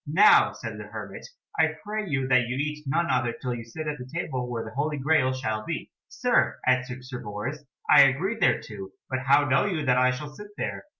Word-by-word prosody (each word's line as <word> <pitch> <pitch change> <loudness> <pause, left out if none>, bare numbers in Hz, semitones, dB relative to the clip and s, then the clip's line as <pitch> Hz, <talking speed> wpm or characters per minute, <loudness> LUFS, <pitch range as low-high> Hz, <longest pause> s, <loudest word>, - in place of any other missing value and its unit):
"Now," 190 +8 +6
said - - -7
the - - -7
hermit, - - -8 0.3
"I 160 0 +3
pray 210 -1 -3
you 135 -3 0
that 125 -2 +3
you 125 - -3
eat 150 +1 -3
none 155 +2 +1
other 120 -2 +1
till 125 0 -4
you 120 -1 -5
sit 155 +8 -7
at 150 -1 -3
the 125 0 -8
table 130 -6 -3
where 115 -2 -3
the 110 - -8
Holy 150 +2 -1
Graal 140 -2 +2
shall 110 -5 -3
be." - - -5 0.2
"Sir," - - +1
answered 125 0 +1
Sir 125 -1 -6
Bors, 105 +9 -5 0.2
"I - - +8
agree 185 - 0
thereto, 105 - 0 0.2
but 130 - 0
how 140 +2 +4
know 140 +7 +3
you 165 -7 -2
that 125 -1 +3
I 125 0 +4
shall 145 +3 -5
sit 210 +7 -10
there?" - - -4
135 Hz, 220 wpm, -26 LUFS, 125-150 Hz, 0.3 s, I